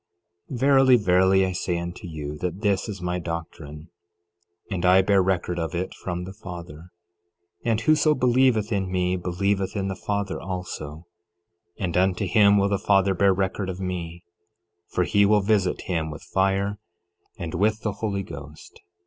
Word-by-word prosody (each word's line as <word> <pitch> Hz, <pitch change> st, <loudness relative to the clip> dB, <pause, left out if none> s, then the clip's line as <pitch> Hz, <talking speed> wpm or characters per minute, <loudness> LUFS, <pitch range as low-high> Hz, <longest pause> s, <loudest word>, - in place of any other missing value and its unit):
11:35 130 Hz, -, -4 dB
Verily, 135 Hz, -1 st, +5 dB
verily, 95 Hz, -2 st, +4 dB
I 95 Hz, -, -2 dB
say 90 Hz, -1 st, -2 dB
unto 85 Hz, +1 st, -6 dB
you, 75 Hz, -2 st, -6 dB
that 90 Hz, +2 st, -4 dB
this 100 Hz, 0 st, 0 dB
is 95 Hz, -4 st, -6 dB
my 90 Hz, 0 st, -1 dB
doctrine, 80 Hz, -2 st, -7 dB, 0.8 s
and 90 Hz, -3 st, -2 dB
I 95 Hz, +1 st, +5 dB
bear 100 Hz, 0 st, +3 dB
record 90 Hz, -2 st, -1 dB
of 85 Hz, +2 st, -3 dB
it 90 Hz, +2 st, -3 dB
from 90 Hz, -1 st, -5 dB
the 95 Hz, +1 st, -8 dB
Father; 85 Hz, -4 st, -10 dB, 0.7 s
and 115 Hz, -2 st, +1 dB
whoso 155 Hz, +3 st, +3 dB
believeth 125 Hz, -4 st, +2 dB
in 95 Hz, -3 st, -1 dB
me 90 Hz, 0 st, 0 dB
believeth 95 Hz, +3 st, -1 dB
in 100 Hz, -1 st, -1 dB
the 95 Hz, -, -3 dB
Father 100 Hz, 0 st, -3 dB
also; 90 Hz, -4 st, -6 dB, 0.7 s
and 90 Hz, -4 st, -3 dB
unto 95 Hz, +2 st, +2 dB
him 100 Hz, +1 st, +5 dB
will 100 Hz, 0 st, +2 dB
the 100 Hz, -1 st, 0 dB
Father 100 Hz, -1 st, +3 dB
bear 100 Hz, +2 st, +3 dB
record 95 Hz, 0 st, -1 dB
of 95 Hz, 0 st, -5 dB
me, 85 Hz, -2 st, -5 dB, 0.7 s
for 90 Hz, -, 0 dB
he 100 Hz, +3 st, +3 dB
will 105 Hz, +1 st, +4 dB
visit 100 Hz, -3 st, +1 dB
him 80 Hz, -3 st, -2 dB
with 75 Hz, -, -9 dB
fire 100 Hz, 0 st, 0 dB, 0.6 s
and 80 Hz, -2 st, -5 dB
with 110 Hz, +2 st, +1 dB
the 105 Hz, -, 0 dB
Holy 100 Hz, -1 st, -3 dB
Ghost. 75 Hz, -3 st, -11 dB
95 Hz, 165 wpm, -24 LUFS, 90-100 Hz, 0.8 s, Verily